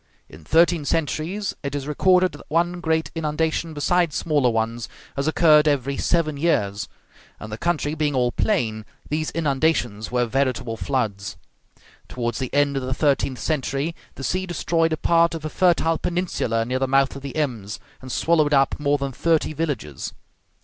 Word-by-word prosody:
In 75 Hz, +1 st, -14 dB
thirteen 165 Hz, -, +3 dB
centuries, 165 Hz, +6 st, -1 dB
it 140 Hz, 0 st, -4 dB
is 140 Hz, -1 st, -4 dB
recorded 185 Hz, +4 st, +3 dB
that -, -, -13 dB
one 175 Hz, +2 st, +1 dB
great 160 Hz, -2 st, 0 dB
inundation, 160 Hz, 0 st, -1 dB
beside 170 Hz, +2 st, +1 dB
smaller 145 Hz, -6 st, +2 dB
ones, 115 Hz, 0 st, -2 dB, 0.3 s
has 140 Hz, +2 st, -1 dB
occurred 155 Hz, -1 st, +5 dB
every 140 Hz, -2 st, +1 dB
seven 155 Hz, -1 st, 0 dB
years; 105 Hz, -, 0 dB, 0.5 s
and 110 Hz, -, -8 dB
the 110 Hz, -, -4 dB
country 155 Hz, -3 st, 0 dB
being 150 Hz, -2 st, 0 dB
all 125 Hz, -1 st, +2 dB
plain, 115 Hz, -, 0 dB, 0.3 s
these 155 Hz, +1 st, -1 dB
inundations 135 Hz, -9 st, 0 dB
were 125 Hz, -1 st, +2 dB
veritable 125 Hz, -1 st, -1 dB
floods. 105 Hz, -2 st, -2 dB, 0.7 s
Towards 120 Hz, -1 st, -3 dB
the 130 Hz, -2 st, -3 dB
end 145 Hz, 0 st, +2 dB
of -, -, -1 dB
the 130 Hz, 0 st, -2 dB
thirteenth 140 Hz, -3 st, +1 dB
century, 140 Hz, +3 st, -1 dB, 0.2 s
the 135 Hz, -, -8 dB
sea 185 Hz, +6 st, -1 dB
destroyed 165 Hz, -1 st, 0 dB
a -, -, -1 dB
part 170 Hz, +1 st, +3 dB
of 155 Hz, -1 st, -6 dB
a -, -, -2 dB
fertile 165 Hz, -2 st, +2 dB
peninsula 170 Hz, -10 st, -1 dB
near 130 Hz, +2 st, -1 dB
the 135 Hz, -, 0 dB
mouth 135 Hz, 0 st, +2 dB
of 140 Hz, -, -7 dB
the 140 Hz, -1 st, -7 dB
Ems, 120 Hz, -9 st, -2 dB, 0.2 s
and 130 Hz, -1 st, -8 dB
swallowed 155 Hz, -2 st, +2 dB
up 135 Hz, +1 st, +2 dB
more 145 Hz, 0 st, +2 dB
than 140 Hz, -1 st, -3 dB
thirty 160 Hz, +3 st, +1 dB
villages. 140 Hz, -, -3 dB
145 Hz, 170 wpm, -23 LUFS, 125-165 Hz, 0.7 s, occurred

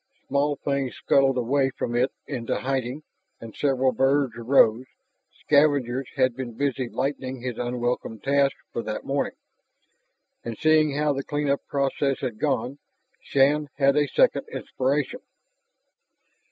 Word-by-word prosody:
Small 145 Hz, +1 st, +1 dB
things 140 Hz, -2 st, -2 dB
scuttled 135 Hz, -1 st, +2 dB
away 135 Hz, +3 st, +1 dB
from 120 Hz, -2 st, -4 dB
it 125 Hz, +2 st, +2 dB
into 125 Hz, -5 st, -3 dB
hiding, 130 Hz, +2 st, -2 dB, 0.4 s
and 115 Hz, -1 st, -10 dB
several 135 Hz, -2 st, +2 dB
birds 135 Hz, 0 st, +2 dB
arose 120 Hz, 0 st, +3 dB, 0.5 s
scavengers 140 Hz, -3 st, +2 dB
had 130 Hz, -2 st, +2 dB
been 120 Hz, -3 st, -6 dB
busy 135 Hz, -3 st, -1 dB
lightening 130 Hz, -1 st, -3 dB
his 125 Hz, -3 st, -4 dB
unwelcome 120 Hz, -2 st, -2 dB
task 140 Hz, +1 st, +2 dB, 0.2 s
for 115 Hz, -, -2 dB
that 110 Hz, -1 st, -5 dB
morning. 140 Hz, +1 st, -1 dB, 1.1 s
And 115 Hz, -2 st, -5 dB
seeing 155 Hz, -2 st, +3 dB
how 150 Hz, -1 st, +2 dB
the 135 Hz, 0 st, -3 dB
clean 145 Hz, 0 st, -2 dB
up 140 Hz, -, 0 dB
process 140 Hz, 0 st, 0 dB
had 110 Hz, -4 st, -4 dB
gone, 135 Hz, +3 st, -1 dB, 0.4 s
Shann 145 Hz, +2 st, +2 dB
had 140 Hz, -1 st, +4 dB
a 145 Hz, -1 st, +3 dB
second -, -, +2 dB
inspiration. -, -, -2 dB
135 Hz, 135 wpm, -25 LUFS, 125-140 Hz, 1.1 s, had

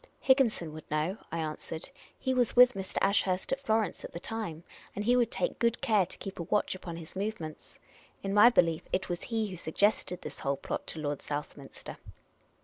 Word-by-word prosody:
" -, -, -38 dB
Higginson 230 Hz, -, +3 dB
would 155 Hz, 0 st, -10 dB
know," 155 Hz, +7 st, -1 dB
I 165 Hz, -, -2 dB
answered. 160 Hz, -, -5 dB
" -, -, -27 dB
He 260 Hz, -, 0 dB
was 245 Hz, -3 st, +3 dB
with 250 Hz, +1 st, +8 dB
Mr. 190 Hz, -2 st, -6 dB
Ashurst 195 Hz, -2 st, +2 dB
at 270 Hz, -, +1 dB
Florence 220 Hz, -7 st, 0 dB
at -, -, -8 dB
the 170 Hz, -, -5 dB
time, 175 Hz, -6 st, -5 dB, 0.3 s
and 205 Hz, -, -3 dB
he 245 Hz, +2 st, +5 dB
would 240 Hz, -3 st, +3 dB
take 190 Hz, -, -2 dB
good 235 Hz, 0 st, +2 dB
care 215 Hz, -9 st, +3 dB
to -, -, -10 dB
keep 195 Hz, -2 st, -7 dB
a -, -, -1 dB
watch 205 Hz, +5 st, +1 dB
upon 175 Hz, -3 st, -7 dB
his 165 Hz, +1 st, -10 dB
movements. 190 Hz, -6 st, -5 dB, 0.5 s
In 195 Hz, 0 st, -1 dB
my 210 Hz, +3 st, +9 dB
belief, 165 Hz, -9 st, +3 dB
it 190 Hz, -, -1 dB
was 175 Hz, -1 st, -2 dB
he 225 Hz, -2 st, -1 dB
who 185 Hz, -, -6 dB
suggested 180 Hz, +2 st, +1 dB
this -, -, -7 dB
whole 140 Hz, 0 st, -1 dB
plot -, -, -4 dB
to 160 Hz, -, -6 dB
Lord 145 Hz, -2 st, -2 dB
Southminster." 145 Hz, -1 st, -6 dB
190 Hz, 210 wpm, -30 LUFS, 165-225 Hz, 0.5 s, my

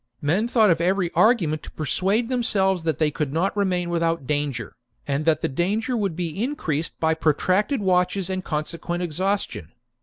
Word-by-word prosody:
Men 175 Hz, +10 st, +1 dB
thought 220 Hz, -5 st, +4 dB
of 165 Hz, -, +1 dB
every 180 Hz, 0 st, +1 dB
argument 175 Hz, -10 st, +3 dB
to -, -, -10 dB
persuade 195 Hz, +9 st, 0 dB
themselves 195 Hz, -7 st, +1 dB
that 160 Hz, -3 st, -1 dB
they 155 Hz, -2 st, +1 dB
could 150 Hz, -2 st, -2 dB
not 175 Hz, +7 st, 0 dB
remain 180 Hz, -4 st, 0 dB
without 165 Hz, -3 st, 0 dB
danger, 145 Hz, -4 st, -2 dB, 0.3 s
and 140 Hz, +2 st, -1 dB
that 155 Hz, -2 st, +2 dB
the -, -, +1 dB
danger 210 Hz, -, -1 dB
would 200 Hz, -7 st, -1 dB
be 175 Hz, +3 st, -3 dB
increased 165 Hz, -, -2 dB
by 160 Hz, 0 st, +2 dB
protracted 185 Hz, -, +1 dB
watches 180 Hz, 0 st, +1 dB
and 185 Hz, -1 st, -3 dB
consequent 170 Hz, +3 st, -3 dB
exhaustion. 175 Hz, -, -2 dB
175 Hz, 170 wpm, -23 LUFS, 155-200 Hz, 0.3 s, thought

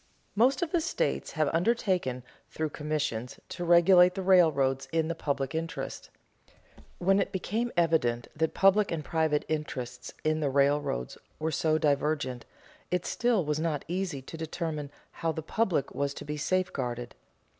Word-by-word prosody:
Most 255 Hz, -, +3 dB
of 330 Hz, -, -3 dB
the 345 Hz, -, +2 dB
states -, -, -1 dB
have 155 Hz, -3 st, 0 dB
undertaken, 180 Hz, -, +1 dB, 0.3 s
through 155 Hz, -1 st, -3 dB
commissions, 150 Hz, -6 st, -3 dB
to 175 Hz, -, -5 dB
regulate 175 Hz, +1 st, +6 dB
the 190 Hz, -, -3 dB
railroads 155 Hz, -8 st, +4 dB
in 160 Hz, 0 st, +1 dB
the -, -, 0 dB
public 140 Hz, -4 st, -2 dB
interest. 165 Hz, +1 st, -4 dB, 0.9 s
When 195 Hz, +2 st, +3 dB
it 195 Hz, -, 0 dB
became 220 Hz, +6 st, -2 dB
evident 150 Hz, -9 st, +2 dB
that 160 Hz, +1 st, 0 dB
public 195 Hz, +2 st, +4 dB
and 155 Hz, -3 st, -3 dB
private 160 Hz, -2 st, +1 dB
interests 130 Hz, -6 st, -4 dB
in 155 Hz, 0 st, +1 dB
the 145 Hz, -2 st, 0 dB
railroads 140 Hz, -, +1 dB, 0.2 s
were 160 Hz, +1 st, -2 dB
so 155 Hz, +1 st, +2 dB
divergent, 145 Hz, -4 st, 0 dB, 0.4 s
it 180 Hz, -1 st, -1 dB
still 235 Hz, -8 st, +1 dB
was 150 Hz, 0 st, -1 dB
not 155 Hz, -3 st, -1 dB
easy 175 Hz, -6 st, -3 dB
to 165 Hz, -, -9 dB
determine 160 Hz, -2 st, -4 dB, 0.2 s
how 165 Hz, -, -2 dB
the 160 Hz, -, -5 dB
public 185 Hz, -5 st, 0 dB
was 140 Hz, 0 st, -2 dB
to -, -, -8 dB
be 150 Hz, +1 st, -3 dB
safeguarded. 130 Hz, -8 st, -2 dB
160 Hz, 155 wpm, -29 LUFS, 140-180 Hz, 0.9 s, regulate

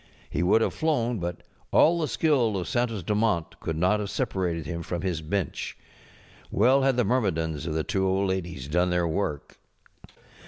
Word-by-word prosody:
He 75 Hz, -, -1 dB
would 95 Hz, +6 st, +4 dB
have -, -, +1 dB
flown, 125 Hz, -8 st, 0 dB
but 85 Hz, 0 st, -4 dB, 0.3 s
all 170 Hz, +2 st, +5 dB
the 155 Hz, -, 0 dB
skill 130 Hz, -12 st, +2 dB
of 90 Hz, -, -3 dB
Santos 115 Hz, -5 st, -1 dB
Dumont 105 Hz, -4 st, 0 dB
could 80 Hz, -, -3 dB
not 90 Hz, +6 st, +2 dB
have 105 Hz, -1 st, -3 dB
separated 90 Hz, -, -2 dB
him 85 Hz, +1 st, -4 dB
from 85 Hz, +1 st, -4 dB
his 90 Hz, -4 st, -1 dB
bench. 90 Hz, +4 st, -3 dB, 0.7 s
Well 130 Hz, +6 st, +4 dB
had 135 Hz, -2 st, +2 dB
the 125 Hz, -, +4 dB
myrmidons 80 Hz, -, 0 dB
of 80 Hz, -, -2 dB
the 80 Hz, -, 0 dB
two 95 Hz, +3 st, 0 dB
old 95 Hz, +1 st, +1 dB
ladies 90 Hz, -7 st, -3 dB
done 90 Hz, +4 st, +2 dB
their 90 Hz, -1 st, +1 dB
work. 80 Hz, -4 st, -3 dB
95 Hz, 180 wpm, -26 LUFS, 85-115 Hz, 0.7 s, all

